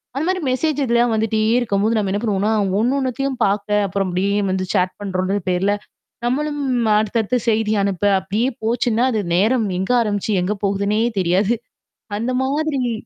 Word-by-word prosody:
அந்த 285 +3 -1
மாதிரி 370 -1 0
மெசேஜ் 290 +2 0
எதுலயாவது 235 -1 +2
வந்துட்டே 220 0 0 0.2
இருக்கும்போது, 215 -1 0
நம்ம 200 -3 0
என்ன 205 +2 -1
பண்ணுவோம்ன்னா, 210 0 +1 0.3
ஒன்னொன்னத்தையும் 265 +2 0
பார்க்க, 200 +1 0 0.2
அப்புறம் 195 0 -1
அப்படியே 190 +3 0 0.2
வந்து 185 0 -1
சேட் 185 -2 0
பண்ணுறோம்ன்ற 190 0 -1
பேர்ல, 190 +3 +1 0.5
நம்மளும் 290 +4 -1 0.4
அடுத்தடுத்து 220 +3 0
செய்தி 215 -1 +1
அனுப்ப, 195 -1 -2 0.2
அப்படியே 210 +7 -1
போச்சுன்னா 235 +1 +1
அது 220 -3 0
நேரம் 220 +5 +2
எங்க 190 +6 -1
ஆரம்பிச்சு 210 -1 -1
எங்க 195 +4 0
போகுதுன்னே 200 +2 0 0.2
தெரியாது. 190 +6 +2 0.6
அந்த 235 +4 -2
மாதிரி 275 -3 -1
215 Hz, 145 wpm, -20 LUFS, 195-250 Hz, 0.6 s, எதுலயாவது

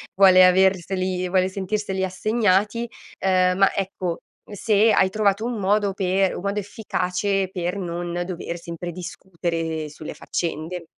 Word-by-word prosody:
vuole 185 -1 +7
averseli, 185 0 +2
vuole 185 0 +2
sentirseli 190 0 -2
assegnati, 210 +3 +1 0.4
uhm, 185 -1 +3
ma, 195 0 +4
ecco, 185 -3 -2 0.3
se 210 +2 +3
hai 190 -2 +4
trovato 210 +1 +1
un 240 -1 -2
modo 200 +1 +1
per 190 0 +1
un - - -6
modo 200 +2 -1
efficace 195 -1 -2
per 180 0 -3
non 175 -1 -3
dover 175 -1 -5
sempre 170 0 -6
discutere 165 -3 -4
sulle 150 +1 -8
faccende. 170 +1 -4
185 Hz, 130 wpm, -23 LUFS, 180-200 Hz, 0.4 s, vuole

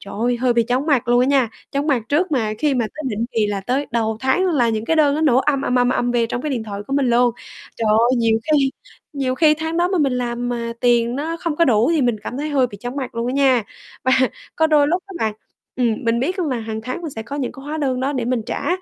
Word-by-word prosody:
trời 200 - -9
ơi, 245 +1 +1
hơi 245 +1 +1
bị 235 -1 +3
chóng 250 +5 -1
mặt 260 -6 +1
luôn 245 0 +4
á 250 - +3
nha, 270 -4 +3 0.2
chóng 280 +1 -1
mặt 265 -7 +1
trước 320 +3 +1
mà 220 -5 0
khi 295 -3 +1
mà 240 -3 +1
tới 310 - -6
định 225 0 -2
kỳ 220 -2 +1
là 200 -1 -2
tới 260 +7 -1
đầu 220 -2 0
tháng 265 +9 +2
là 275 -9 +2
những 220 -1 -1
cái 325 - +1
đơn 290 -2 +4
nó 310 - -1
nổ 265 -5 +4
ầm, 275 0 +1
ầm, 250 - -1
ầm, 245 0 +3
ầm 245 -1 0
về 235 -1 +1
trong 245 +2 -4
cái 305 - -2
điện 250 -5 -2
thoại 205 -2 -6
của 275 - -6
mình 275 -3 +2
luôn. 240 +1 +4 0.5
Trời 225 - -1
ơi, 235 +4 +4
nhiều 225 -1 +2
khi 275 -3 +3 0.4
nhiều 265 -3 -1
khi 305 +1 +4
tháng 320 +1 -4
đó 350 +1 +2
mà 375 -2 0
mình 275 -4 +2
làm 245 -1 -2
mà 235 -1 -3
tiền 240 0 +2
nó 320 +3 -3
không 330 -3 -3
có 335 - +4
đủ, 235 -1 +3
thì 305 - +2
mình 240 -3 +1
cảm 250 - -5
thấy 300 +1 -2
hơi 270 -3 +3
bị 205 -4 -11
chóng 245 +2 -5
mặt 260 -4 -4
luôn 230 +1 -2
á 250 - -1
nha. 265 -4 +3 0.4
Và 260 - +3 0.4
có 320 - +3
đôi 300 -2 +4
lúc 355 +3 0
á 390 - -10
bạn 220 -5 -1 0.4
ừm, 240 0 0
mình 230 +1 +1
biết 365 +8 -1
luôn 335 -5 0
là 255 - 0
hàng 220 0 -5
tháng 255 +9 -5
mình 320 - -4
sẽ 225 -4 -6
có 275 +6 -6
những 265 -4 -3
cái 270 - -12
hóa 305 +2 -4
đơn 260 -4 -1
đó 270 +2 0
để 255 -4 -2
mình 245 -1 -1
trả, - - -3
255 Hz, 295 wpm, -20 LUFS, 235-290 Hz, 0.5 s, luôn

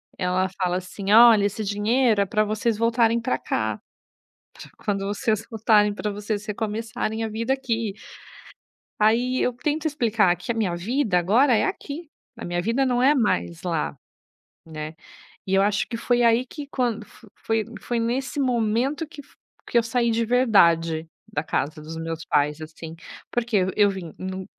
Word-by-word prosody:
ela 180 +1 0
fala 180 -1 +1
assim: 195 +2 -5
"Olha, 225 -2 +8
esse 205 +2 -2
dinheiro 215 +2 +2
é - - +2
pra 215 +1 +2
vocês 215 +1 -1
voltarem 230 0 +2
para 235 +2 -1
cá. - - -2 0.8
Para - - -12
quando 200 -2 -1
vocês 210 +2 -1
voltarem, 215 -2 +3
pra 210 +1 -3
vocês 210 +1 -4
recomeçarem 220 +1 -3
a - - -2
vida 230 +4 -1
aqui". 230 -6 -2 1.1
Aí 240 +4 +2
eu 250 - +1
tento 300 +6 -2
explicar 225 - +2
que 180 +6 -5
a - - -3
minha 200 -6 0
vida 215 +2 0
agora 230 +10 +4
é - - +2
aqui, 305 +3 -5 0.3
a 230 - -7
minha 175 0 -1
vida 230 +8 +1
não 245 -1 +1
é 280 +4 +5
mais 85 - 0
lá, 75 -1 -2 0.7
né, 155 0 -7 0.5
e 190 - 0
eu 195 - +5
acho 205 0 +1
que 230 - -4
foi 245 +1 +1
aí 235 +2 +3
que 295 +2 -8
quando 240 -5 -1 0.3
foi 225 -1 -1 0.2
foi 240 +2 -2
nesse 250 +5 -2
momento 250 +4 0
que 310 -2 -11
f - - -25 0.3
que - - -3
eu - - +3
saí 235 0 0
de 230 +1 +1
verdade, 170 -10 +3 0.2
da 145 - -1
casa 150 +1 -2
dos 155 +2 -8
meus 165 0 -5
pais, 150 +1 +1
assim. 160 +1 -9 0.4
Porque 240 -3 +1 0.2
eu 205 -1 +5
vim 185 -5 -7
em 190 0 -5
220 Hz, 170 wpm, -24 LUFS, 190-240 Hz, 1.1 s, Olha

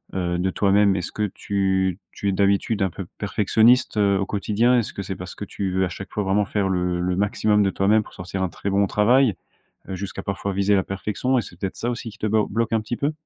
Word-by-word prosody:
heu, 90 -2 -1
de 95 +1 +1
toi-même, 100 0 +3
est-ce 90 -3 -3
que 105 -1 -2
tu 95 -2 0
tu 100 - -2
es, - - +2
d'habitude, 100 +2 +1
un 95 - +1
peu 95 - -7
perfectionniste, 110 +4 +3
heu, 100 -1 +3
au 95 - 0
quotidien? 110 +5 +2
Est-ce 115 - -3
que - - -5
c'est 95 - -5
parce 90 0 -8
que - - -7
tu 100 -1 -4
veux, 95 0 +2
à - - -3
chaque 95 +3 -8
fois, 105 - -2
vraiment 100 +2 +1
faire 100 0 -1
le 90 -1 0
le 90 0 0
maximum 105 +1 +2
de 100 - +2
toi-même 105 +3 +3
pour - - -16
sortir 90 +1 -5
un - - +1
très 100 - -5
bon 100 0 +2
travail, 115 +2 +3 0.5
heu, 95 - -3
jusqu'à, 95 +1 -6
parfois, 100 0 -3
viser 100 +1 +2
la 95 - +2
perfection, 105 +7 -1
et - - 0
c'est 90 -5 -12
peut-être 95 -1 -3
ça, 120 - -2
aussi, 120 -1 -5
qui 110 - -16
te 110 - -1
blo 110 0 +2
bloque 115 +2 -1
un 110 - +3
petit 110 +3 -4
peu? 145 +2 0
100 Hz, 255 wpm, -23 LUFS, 95-105 Hz, 0.5 s, toi-même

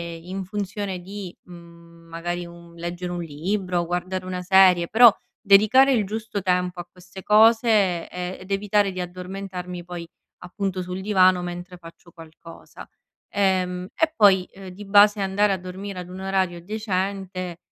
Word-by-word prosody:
in 185 +4 -7
funzione 200 -1 -4
di, 195 -1 -8
mhmm, 170 -1 -16
magari 175 +1 -4
un 170 0 -14
leggere 175 +1 -5
un 175 -1 -4
libro, 175 +3 -2
guardare 180 +2 -3
una 185 -1 -4
serie, 180 -2 +5
però 235 0 +7 0.3
dedicare 220 +6 +5
il 215 -5 +1
giusto 215 0 -5
tempo 180 -1 -1
a 175 - -7
queste 185 +1 -13
cose, 215 -5 +4
ehm, 180 +1 -5
ed 185 +2 -12
evitare 200 0 +1
di 185 - -4
addormentarmi 180 0 -7
poi 175 -1 -8 0.4
appunto 190 0 -4
sul 180 +1 -6
divano 185 -3 +3
mentre 175 +1 -7
faccio 170 0 -15
qualcosa. 165 0 -14 0.5
Ehm, 185 -2 0
e 320 -1 +1
poi, 190 -3 +5
ehm, 190 -1 -11
di 200 +3 -11
base 205 +1 +5
andare 195 +1 +1
a 190 - -2
dormire 185 +1 -7
ad 180 0 -8
un 185 +1 -9
orario 190 -3 -1
decente 190 -3 -4
185 Hz, 150 wpm, -23 LUFS, 175-200 Hz, 0.5 s, però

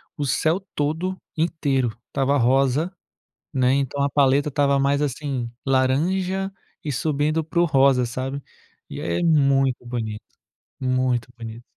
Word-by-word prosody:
o 145 - -2
céu 155 +6 +1 0.2
todo 160 +6 -1 0.2
inteiro, 140 -8 0
estava 140 +1 +1
rosa, 135 +7 +2 0.6
né, 130 -2 +2
então 140 0 -1
a 140 - +2
paleta 140 +1 +3
estava 140 0 +2
mais 140 +1 +2
assim, 135 -3 -2 0.2
laranja 180 +9 +1 0.3
e 150 - -2
subindo 155 +3 0
para 170 +2 0
o - - +5
rosa, 135 -3 +4
sabe. 130 +3 -4 0.5
E, - - -7
aí 85 0 -1
é - - -2
muito 135 -5 +3
bonito 110 -3 -4 0.6
muito 130 -2 0
bonito. 115 0 -8
140 Hz, 140 wpm, -23 LUFS, 130-150 Hz, 0.6 s, o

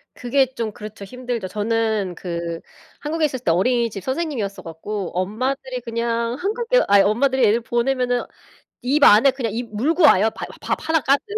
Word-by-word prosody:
그게 265 +2 +2
좀 225 -2 -3
그렇죠. 210 -1 -10
힘들죠. 245 -3 -4
저는 215 -2 -1
그 170 -2 -4 0.4
한국에 310 +1 -1
있었을 260 -4 -3
때 165 - +2
어린이집 215 +1 +1
선생님이었어 260 -8 -3
갖고 180 +4 -5
엄마들이 255 +6 -2
그냥 230 0 -2
한국에 465 - +1
아이 200 0 +6
엄마들이 255 +6 +2
애를 225 +3 +3
보내면은 245 +1 0 0.6
입 280 +4 +1
안에 230 +6 +7
그냥 245 -5 -3
입 230 -2 -5
물고 310 - +1
와요. 220 -6 +6
바 - - -5 0.2
밥 - - -1
하나 320 0 +3
가득. 275 +2 +2
235 Hz, 360 characters per minute, -21 LUFS, 210-265 Hz, 0.6 s, 안에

